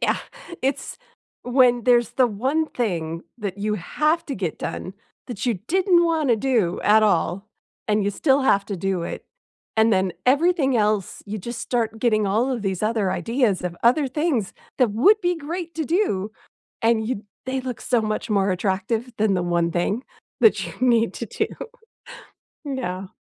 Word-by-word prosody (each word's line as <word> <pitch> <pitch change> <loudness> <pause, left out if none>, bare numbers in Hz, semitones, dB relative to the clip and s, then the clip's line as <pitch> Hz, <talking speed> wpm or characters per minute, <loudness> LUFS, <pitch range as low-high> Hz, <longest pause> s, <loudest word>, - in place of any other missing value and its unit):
Yeah. - - +2 0.4
It's 275 +1 -2 0.4
when 245 -2 +3
there's 240 -1 +4
the 255 - +3
one 260 +9 0
thing 170 - -3 0.2
that 205 -3 -4
you 210 +1 -1
have 305 - 0
to 275 - -3
get 180 -6 -3
done 185 - -5 0.3
that 240 0 -5
you 235 - +2
didn't 345 - +2
wanna 310 -8 +2
do 225 -8 +1
at 215 +1 +5
all, 200 -1 +1 0.4
and 210 -1 +2
you 200 - +1
still 270 +5 +2
have 200 -6 +3
to 200 - -4
do 190 -1 -1
it, - - -6 0.5
and 220 +1 +4
then 190 -2 +1
everything 280 -1 +3
else, 210 -3 0
you 210 +1 -4
just 235 +5 -6
start 225 -3 -1
getting 215 -4 +2
all 220 +7 +1
of 240 - -3
these 190 -2 -2
other 215 -3 +1
ideas 205 +2 0
of 175 -1 -3
other 255 +5 +4
things 270 - -1 0.3
that 250 -5 +3
would 390 - +5
be 355 0 +2
great 335 +2 -5
to 320 - -1
do, 220 - 0 0.5
and 225 -1 +2
you 210 -5 -3 0.2
they 265 0 -1
look 250 -3 -5
so 240 -3 +1
much 215 0 -2
more 200 -1 +2
attractive 200 +6 -1
than 215 -1 +2
the 180 - 0
one 170 -1 0
thing 200 +8 -1 0.4
that 445 - +4
you - - -9
need 230 -2 +3
to - - -4
do. - - -1 1.2
Yeah. 195 -10 -4
225 Hz, 175 wpm, -23 LUFS, 200-265 Hz, 1.2 s, at